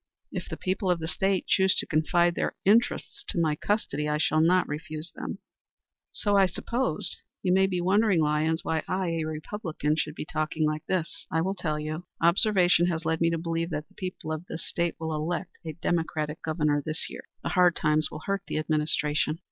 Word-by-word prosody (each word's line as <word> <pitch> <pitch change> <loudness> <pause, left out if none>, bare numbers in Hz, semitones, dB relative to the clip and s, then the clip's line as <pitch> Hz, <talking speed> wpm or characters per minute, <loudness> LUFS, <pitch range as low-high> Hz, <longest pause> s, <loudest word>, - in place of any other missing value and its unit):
"If - - -5
the - - -5
people 190 0 -1
of 180 - +3
the 160 -1 -4
State 190 +2 +1
choose 190 -1 +3
to - - 0
confide 170 +2 +2
their - - -1
interests 230 +5 +2
to 185 - -1
my 155 -2 +2
custody, 150 -6 -1
I 150 - +1
shall 155 +1 +2
not 180 +3 +4
refuse 155 +2 -5
to - - -44
serve - - -9
them." - - -4 0.7
"So 205 -1 +1
I 195 -1 +6
supposed. 235 +8 -2 0.3
You 180 -2 +3
may 190 +1 +5
be 185 -2 -1
wondering, 195 +1 +3
Lyons, 155 +1 +1
why 160 -1 0
I, 185 -1 0
a 165 -1 -1
Republican, 155 -1 -2
should 155 -1 -2
be - - -5
talking 155 0 -1
like 155 0 -1
this. 175 -4 -2
I 160 - +1
will 190 +3 0
tell 160 -5 -2
you. 155 +3 -5
Observation 175 -1 +4
has 165 -2 -2
led 160 0 0
me 165 - +4
to 165 - 0
believe 165 0 -2
that 155 -2 -4
the - - -24
people 185 -4 -5
of 155 +1 -3
this - - -5
State 170 -1 -1
will 160 -1 -2
elect 165 +4 -2
a 160 -1 -5
Democratic 160 -2 -1
Governor 150 -2 +1
this 155 +2 -2
year. - - -9 0.2
The - - -1
hard 180 -1 +4
times 155 0 +2
will 155 - -8
hurt 195 -1 0
the - - -2
administration. 150 0 +1
165 Hz, 210 wpm, -27 LUFS, 155-180 Hz, 0.7 s, I